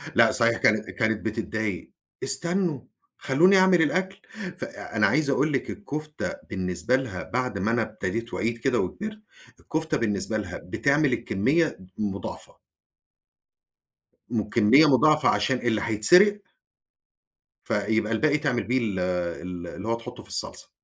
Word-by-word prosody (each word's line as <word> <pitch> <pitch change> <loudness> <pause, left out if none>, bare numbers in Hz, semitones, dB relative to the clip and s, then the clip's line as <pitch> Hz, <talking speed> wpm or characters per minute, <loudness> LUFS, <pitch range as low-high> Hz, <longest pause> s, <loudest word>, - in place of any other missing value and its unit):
لأ، 115 -1 +6
صحيح 115 -2 +2
كانت 110 0 +2
كانت 110 -2 -1
بتضايق. 110 -3 -3 0.3
"استنّوا 170 0 0 0.4
خلّوني 175 +8 +4
أعمل 185 -2 +5
الأكل" 190 +5 -1 0.4
فأنا - - -1
عايز 155 -2 +1
أقول 145 +2 +1
لِك 130 - -1
الكفتة 155 -6 -5 0.2
بالنسبة 95 +5 -1
لها 125 -9 -3
بعد 125 -5 -2
ما 105 +4 0
أنا 115 0 +1
ابتديت 110 +2 -4
وعيت 115 +1 -1
كده 125 +1 0
وكِبرت، 215 - -4 0.4
الكفتة 160 0 -2
بالنسبة 110 0 -1
لها 90 -4 -5
بتعمل 140 +7 +1
الكمية 150 - 0 0.2
مُ 105 -2 -1
مضاعفة. - - -7 1.7
والكمية 115 +6 +4
مضاعفة 150 +2 +4
عشان 105 +5 +1
اللي 115 -4 0
هيتسرق 180 - +5 1.2
فيبقى 110 +1 0
الباقي 150 +5 +2
تعمل 145 -5 -1
بيه 125 +2 0
ال 100 -5 -2
ال 90 -1 -3
اللي 95 +5 -7
هو 115 - +1
تحُطُّه 115 - -9
في - - -12
الصلصة. - - -4
120 Hz, 135 wpm, -25 LUFS, 105-150 Hz, 1.7 s, لأ